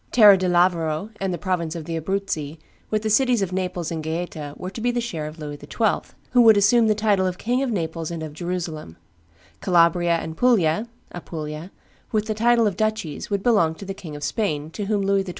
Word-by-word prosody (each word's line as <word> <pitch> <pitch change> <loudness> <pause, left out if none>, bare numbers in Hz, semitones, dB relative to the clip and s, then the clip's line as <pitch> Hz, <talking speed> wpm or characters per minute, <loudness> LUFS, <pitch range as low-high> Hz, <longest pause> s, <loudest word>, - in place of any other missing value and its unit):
Terra 210 -4 +8
di 185 -1 -1
Lavoro 175 +1 +1
and 195 -1 0
the 175 - -2
province 170 -2 -2
of 165 -2 -6
the 165 - -4
Abruzzi, 160 -3 -3 0.3
with 215 0 -1
the 220 - 0
cities 245 -2 +3
of 185 -1 -4
Naples 180 -3 -2
and 165 -1 -3
Gaeta, 160 -2 -4
were 185 +1 -6
to 210 - -7
be 245 - +1
the 245 0 0
share 170 -11 -4
of 155 +2 -9
Louis 145 -2 -7
XII., 220 -3 -1 0.2
who 250 - +5
would 220 -3 +7
assume 220 +3 +4
the 215 - +3
title 205 -3 +2
of 180 0 -3
King 245 +6 0
of 270 - 0
Naples 165 -6 -3
and 165 -2 -5
of 155 -2 -7
Jerusalem; 165 - -5 0.6
Calabria 170 -1 +3
and 160 -1 -4
Puglia 215 -3 +2 0.3
(Apulia), 155 -1 -6 0.4
with 215 -1 0
the 215 - -1
title 230 +1 +3
of 200 -3 -1
duchies, 215 -9 -2
would 200 -2 -1
belong 200 -10 +3
to 195 - -10
the 195 - -4
King 160 -6 -9
of 145 - -7
Spain, 155 -4 -2
to 205 +4 -4
whom 205 -1 0
Louis 195 0 +2
XII. 190 - -8
185 Hz, 220 wpm, -23 LUFS, 160-215 Hz, 0.6 s, Terra